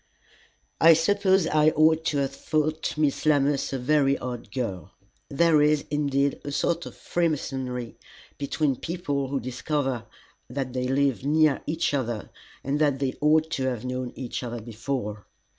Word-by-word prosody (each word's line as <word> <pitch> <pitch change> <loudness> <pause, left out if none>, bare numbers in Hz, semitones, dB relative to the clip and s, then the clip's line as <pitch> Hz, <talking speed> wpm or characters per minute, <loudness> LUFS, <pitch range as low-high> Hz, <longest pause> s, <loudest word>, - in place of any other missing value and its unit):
I 165 0 +8
suppose 190 +2 +3
I 155 -1 +4
ought 160 +1 +3
to 150 - 0
have 135 -1 -1
thought 155 +2 -1
Miss 150 -3 +1
Lammas 145 -2 +2
a 135 - -1
very 140 +1 +2
odd 125 -1 -6
girl. 100 -8 -4 0.4
There 155 +1 +4
is, 150 0 +3
indeed, 140 -1 0
a 145 - -5
sort 170 +4 0
of - - -11
freemasonry 135 -7 -2 0.4
between 140 -1 0
people 145 -5 -2
who 135 +1 -1
discover 130 -1 -2 0.4
that 130 0 -4
they 125 0 -1
live 135 -1 +1
near 150 0 +3
each 160 0 0
other 120 -6 -2 0.3
and 140 +2 -1
that 145 -3 +2
they 135 -1 -1
ought 155 +1 +3
to 130 - -1
have 125 -2 -2
known 125 -1 -3
each 125 -3 -5
other 120 -1 -5
before. 110 -1 -5
140 Hz, 155 wpm, -26 LUFS, 130-155 Hz, 0.4 s, I